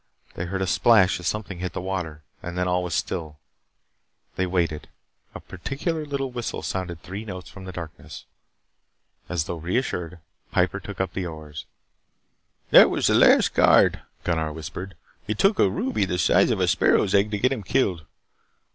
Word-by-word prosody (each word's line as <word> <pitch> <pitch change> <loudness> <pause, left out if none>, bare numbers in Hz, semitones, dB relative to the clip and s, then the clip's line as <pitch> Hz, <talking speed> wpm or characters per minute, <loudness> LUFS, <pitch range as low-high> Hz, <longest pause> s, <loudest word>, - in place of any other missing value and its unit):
They 85 - -4
heard 95 +2 -2
a - - 0
splash 95 +1 +4
as 90 - -4
something 105 -4 -3
hit 90 -2 -4
the - - -3
water 90 -5 -4 0.2
and 85 +1 -6
then 90 0 0
all 90 0 +1
was 90 -3 -3
still. 75 -2 -3 1.0
They 95 - 0
waited. 85 -4 -1 0.5
A - - -5
peculiar 150 - -4
little 135 -2 -3
whistle 120 -2 -4
sounded 90 -3 -4
three 100 +4 -6
notes 95 -4 -8
from 95 -1 -11
the 95 - -6
darkness. 80 -4 -9 1.0
As 90 -3 0
though 85 - -5
reassured, 90 -1 -2 0.3
Piper - - +1
took - - -9
up 95 - -1
his 95 -2 -3
oars. 75 -2 -8 1.1
"That - - +9
was - - -1
the - - +4
last - - +5
guard," - - +5 0.2
Gunnar 80 -3 -1
whispered. 85 +4 -7 0.3
"It 105 -1 -2
took 195 - +3
a 100 - +5
ruby 105 +1 -1
the 90 -1 -2
size 90 - +4
of - - 0
a - - +2
sparrow's 95 - +3
egg 100 +1 +3
to 105 - -2
get 130 +5 +2
him 130 -5 -2
killed. 95 - 0
90 Hz, 175 wpm, -24 LUFS, 85-105 Hz, 1.1 s, That